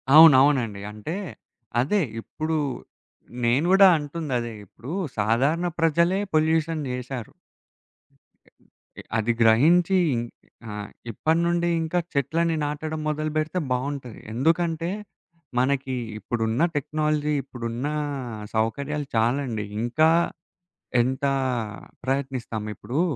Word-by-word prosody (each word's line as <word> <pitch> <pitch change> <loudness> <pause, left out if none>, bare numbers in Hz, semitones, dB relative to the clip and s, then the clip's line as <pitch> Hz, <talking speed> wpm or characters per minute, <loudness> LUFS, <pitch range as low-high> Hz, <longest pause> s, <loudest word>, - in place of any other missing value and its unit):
అవునవునండి. 135 -8 +7
అంటే, 105 - -5 0.7
అదే 200 +10 +2 0.2
ఇప్పుడు 155 +6 -3 0.9
నేను 130 +8 +3
కూడా 195 0 +8
అంటుందదే. 145 -6 -3
ఇప్పుడు 120 +9 -10 0.3
సాధారణ 135 +11 +2
ప్రజలే 170 +4 +3
పొల్యూషన్ 160 0 +2
జేశారు. 125 -2 -5 1.2
ఇ - - -51 0.5
ఇ - - -9
అది 110 +2 +1
గ్రహించి 160 +12 +5 0.2
ఇన్ 120 -1 -1 0.5
ఆహ్, 105 0 -6 0.2
ఇప్పటి 160 +9 +1
నుండి 170 0 +1
ఇంకా 160 +2 0
చెట్లని 165 +4 +1
నాటడం 155 +2 -3
మొదలుపెడితే 155 +3 -1
బావుంటది. 130 -1 -3
ఎందుకంటే 165 +5 +1 0.7
మనకి 130 0 0 0.2
ఇప్పుడున్న 115 +2 -1
టెక్నాలజీ, 150 +1 0
ఇప్పుడున్న 120 +1 -4 0.7
సౌకర్యాలు 140 +6 -1
చాలండి. 115 -2 0 0.2
ఇంకా 155 +7 +3 0.9
ఎంత 130 +4 -1 0.8
ప్రయత్నిస్తాం, 130 -4 -2
ఇప్పడూ 125 +9 -2
140 Hz, 95 wpm, -25 LUFS, 120-160 Hz, 1.2 s, కూడా